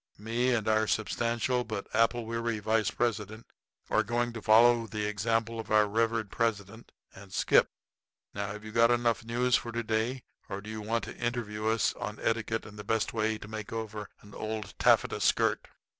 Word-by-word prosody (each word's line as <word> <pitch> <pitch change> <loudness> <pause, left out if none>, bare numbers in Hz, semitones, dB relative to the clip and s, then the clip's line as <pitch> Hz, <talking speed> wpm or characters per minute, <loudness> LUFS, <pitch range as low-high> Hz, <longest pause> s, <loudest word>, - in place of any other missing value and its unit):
Me 115 +4 0
and 115 -3 0
our 110 0 +3
substantial 120 +3 0
but 110 -4 -5
apple 115 +1 +2
weary 115 0 -2
vice 110 0 +1
president 110 -1 -2 0.5
are - - +4
going 120 +2 -1
to 115 - -6
follow 115 +2 +5
the 105 0 -3
example 115 +2 -1
of 115 - -6
our 105 -1 +4
revered 115 0 0
president, 110 0 -2 0.2
and 100 0 -13
skip. - - +4 0.6
Now, 100 0 -3
have 105 +2 -7
you 110 - -7
got 115 +1 +5
enough 120 -1 +2
news 120 +2 +1
for 115 - -6
to 120 0 -2
day, 115 +3 -1 0.3
or 95 - -4
do 105 +2 -8
you 110 0 -5
want 115 +1 -1
to - - -7
interview 115 -3 -2
us 110 0 +2
on 105 - -6
etiquette 115 0 -1
and 105 0 -11
the - - -6
best 110 0 0
way 110 -1 0
to 105 - -10
make 110 -1 -6
over 110 -2 -5
an 105 0 -15
old 110 -1 -5
taffeta - - +3
skirt?" - - +2
110 Hz, 190 wpm, -30 LUFS, 105-115 Hz, 0.6 s, follow